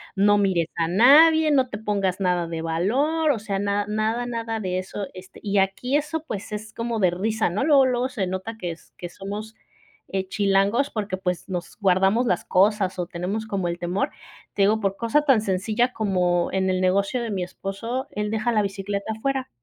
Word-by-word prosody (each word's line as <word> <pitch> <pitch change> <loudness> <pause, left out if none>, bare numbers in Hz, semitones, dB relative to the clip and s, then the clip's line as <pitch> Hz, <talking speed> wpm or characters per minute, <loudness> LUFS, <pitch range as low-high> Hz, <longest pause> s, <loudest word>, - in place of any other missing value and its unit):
no 205 +1 +4
mires 185 -5 +1
a 165 -1 +1
nadie, 305 - +6
no 265 -3 +3
te 210 - -5
pongas 200 -3 -1
nada 180 -2 +1
de 165 -1 -4
valor", 265 - +1
o 235 - -1
sea, 205 -2 -3
nada, 200 0 0
nada, 220 +3 0
nada 230 -2 -3
de 185 -2 -1
eso, 190 +1 -5
este, 185 +1 -12
y 205 -1 0
aquí 195 +8 +1
eso 305 +1 -3
pues 210 -6 -6
es 215 +1 -6
como 230 -1 -3
de 180 -2 +4
risa, 215 +3 0
¿no?, 200 +9 -1
luego, 285 -3 +6
luego 250 0 +1
se 230 -8 -3
nota 190 +5 -4
que 180 -5 -4
es 165 - -13
que 175 - -7
somos, 205 +4 -7 0.5
eh, 190 -1 -3
chilangos 200 +6 +1
porque, 205 -3 -3
pues, 180 0 -3
nos 180 -2 -5
guardamos 195 +4 +3
las 180 -4 0
cosas 190 -1 +2
o 175 - -2
tenemos 190 +6 -4
como 195 -4 -2
el 170 0 -3
temor, 175 +3 -1 0.4
te 205 - -1
digo 210 +3 +4
por 195 -2 -1
cosa 235 +6 +2
tan 265 -7 +4
sencilla 215 +5 0
como 180 -4 +1
en 190 0 0
el 185 0 +1
negocio 200 +6 +1
de 230 - -4
mi 190 - -2
esposo, 195 +7 -4
él 210 0 -2
deja 220 +2 0
la 215 -2 +2
bicicleta 200 +1 -3
afuera, 265 +2 -2
205 Hz, 200 wpm, -24 LUFS, 185-230 Hz, 0.5 s, nadie